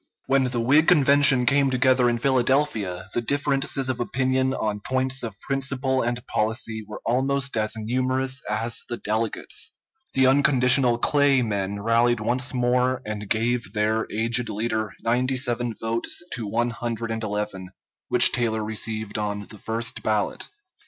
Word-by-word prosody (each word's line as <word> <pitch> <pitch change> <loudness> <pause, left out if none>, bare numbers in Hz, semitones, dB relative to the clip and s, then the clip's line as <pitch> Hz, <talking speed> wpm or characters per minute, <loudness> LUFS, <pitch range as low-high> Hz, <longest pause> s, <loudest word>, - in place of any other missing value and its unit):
] - - -48
When 135 0 +2
the 125 -1 -2
Whig 145 +7 +3
Convention 140 -5 +5
came 140 +2 +3
together 130 -1 +3
in 120 - 0
Philadelphia, 120 -8 0
the 120 - 0
differences 140 +1 0
of 130 -2 -2
opinion 130 +1 0
on 105 -1 -2
points 130 +4 -1
of 110 -4 -6
principle 135 -1 0
and 120 0 -3
policy 110 0 -2
were 105 - -9
almost 135 +3 0
as 110 0 0
numerous 130 +4 -1
as 115 +2 -1
the 120 - -3
delegates. 110 +1 -3 0.4
The 130 0 +4
unconditional 130 -2 +4
Clay 140 0 +3
men 100 -2 -3
rallied 115 +1 +2
once 120 +4 0
more 125 +1 0
and 105 -1 -6
gave 115 -2 -1
their 110 +1 0
aged 115 +2 0
leader 110 -1 -2
97 120 -1 -1
votes 115 +8 -3
to 115 -4 -4
111 115 -4 -3 0.4
which - - +6
Taylor 110 -2 -1
received 110 -1 -4
on 105 -1 -3
the 105 - -11
first 115 +1 -3
ballot. 105 -2 -1
120 Hz, 140 wpm, -24 LUFS, 110-130 Hz, 0.4 s, which